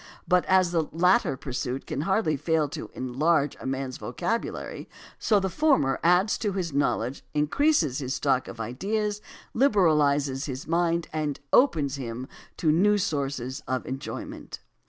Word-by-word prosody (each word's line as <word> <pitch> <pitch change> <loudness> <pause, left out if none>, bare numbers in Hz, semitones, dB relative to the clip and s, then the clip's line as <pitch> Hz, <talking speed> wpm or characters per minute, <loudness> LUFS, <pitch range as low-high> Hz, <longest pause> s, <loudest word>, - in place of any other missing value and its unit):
But 180 0 +3
as 185 -2 +3
the 165 -3 0
latter 180 - +3
pursuit 130 0 -4
can 140 - -3
hardly 190 -2 +1
fail 160 +1 +1
to - - -7
enlarge 140 +3 +1
a - - -6
man's 135 -1 -3
vocabulary, 225 - -4 0.3
so 210 -3 +3
the 190 - -1
former 190 - +2
adds 180 +5 +3
to 205 -3 -1
his 180 -5 -3
knowledge, 135 -2 0
increases 150 - +2
his 130 -1 -3
stock 130 -1 +1
of 115 - -9
ideas, 205 - -2 0.3
liberalizes 150 - +3
his 130 -1 -5
mind, 170 0 +1
and 150 -2 -2
opens 150 - +3
to - - -6
him 120 +1 -5 0.4
new 180 +7 +4
sources 140 -7 -2
of 130 0 -2
enjoyment. 135 +1 -7
150 Hz, 145 wpm, -26 LUFS, 135-185 Hz, 0.4 s, new